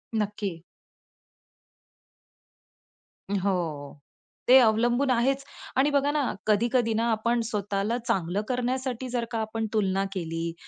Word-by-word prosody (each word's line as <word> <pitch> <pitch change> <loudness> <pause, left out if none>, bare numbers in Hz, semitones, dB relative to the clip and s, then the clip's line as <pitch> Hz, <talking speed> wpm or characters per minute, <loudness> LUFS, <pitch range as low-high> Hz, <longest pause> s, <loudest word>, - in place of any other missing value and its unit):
नक्की. 205 -5 -2 2.7
हो. 175 -8 -2 0.5
ते 255 +2 +9
अवलंबून 240 +4 +3
आहेच. 265 +3 +1 0.3
आणि 280 +3 +4
बघा 285 0 +2
ना 300 -1 +1 0.3
कधी-कधी 230 +2 +2
ना 225 +1 +1
आपण 235 +2 +1
स्वतःला 205 +2 -1
चांगलं 185 +2 0
करण्यासाठी 255 0 -2
जर 240 -1 -1
का 225 - -1
आपण 220 +1 -2
तुलना 195 -2 +1
केली, 165 -2 -3
220 Hz, 105 wpm, -27 LUFS, 195-245 Hz, 2.7 s, ते